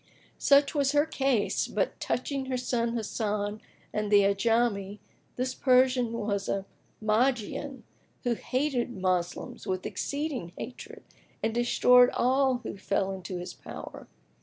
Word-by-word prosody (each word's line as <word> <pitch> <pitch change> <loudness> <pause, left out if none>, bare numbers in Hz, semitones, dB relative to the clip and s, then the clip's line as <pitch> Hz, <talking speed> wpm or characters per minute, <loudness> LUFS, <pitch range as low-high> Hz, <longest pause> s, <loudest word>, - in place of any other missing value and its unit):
Such 280 0 +5
was 285 -2 +1
her 290 +1 +4
case; 270 -8 0
but - - -2
touching 265 +1 -2
her 260 -1 -1
son 235 -2 -1
Hasan 210 -1 -2 0.3
and 210 -1 -2
the 205 -1 +7
Ajami, 200 0 +1 0.4
this 255 +1 -1
Persian 255 -2 +3
was 205 -3 -2
a 195 -1 -1 0.3
Magian, 245 +4 0 0.4
who 245 -2 +1
hated 255 +1 -1
Moslems 185 -5 -2
with 185 -1 -2
exceeding 280 - -3
hatred 250 - -8 0.4
and 225 - +1
destroyed 245 +1 +5
all 260 0 +2
who - - -6
fell 195 0 -1
into 185 -1 -5
his 175 0 -6
power. - - -9
235 Hz, 130 wpm, -28 LUFS, 205-260 Hz, 0.4 s, the